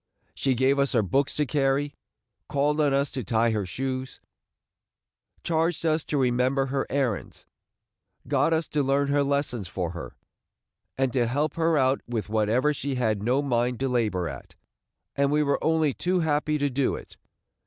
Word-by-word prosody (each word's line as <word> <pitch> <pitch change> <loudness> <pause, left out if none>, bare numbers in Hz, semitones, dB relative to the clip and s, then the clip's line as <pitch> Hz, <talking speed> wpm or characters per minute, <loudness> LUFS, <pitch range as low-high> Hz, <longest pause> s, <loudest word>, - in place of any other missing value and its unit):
She 135 -2 0
gave 135 +3 +2
us 140 0 +1
her 115 -4 +3
books 135 +9 0
to 150 - +1
carry, 140 +1 0 0.6
called 150 +1 +1
on 145 -2 +3
us 140 +1 +1
to 130 - -4
tie 115 +3 +2
her 105 -4 -1
shoes, 130 +4 -4 1.2
charged 165 +1 0
us 155 -1 +2
to 150 - -1
remember 130 +1 +2
her 135 0 -2
errands, 130 -7 -2 0.8
got - - +2
us 160 0 +1
to 150 - 0
learn 140 +1 +1
her 145 0 +3
lessons 140 -7 -1
for 85 -1 -3
her, 85 -2 -8 0.8
and 130 -2 0
to 120 -3 +2
help 145 +5 0
her 165 -1 +2
out 130 0 +2
with 115 -3 -3
whatever 110 +7 +2
she 140 -1 -3
had 110 -5 0
no 125 +6 +1
mind 125 -2 0
to 135 - +1
labor 105 -8 0
at; 70 -4 -9 0.6
and 140 0 +2
we 150 0 +3
were 140 -1 0
only 160 -3 +2
too 180 +4 0
happy 150 -1 +1
to 145 -1 0
do 130 +1 +1
it. - - -11
135 Hz, 175 wpm, -26 LUFS, 120-145 Hz, 1.2 s, her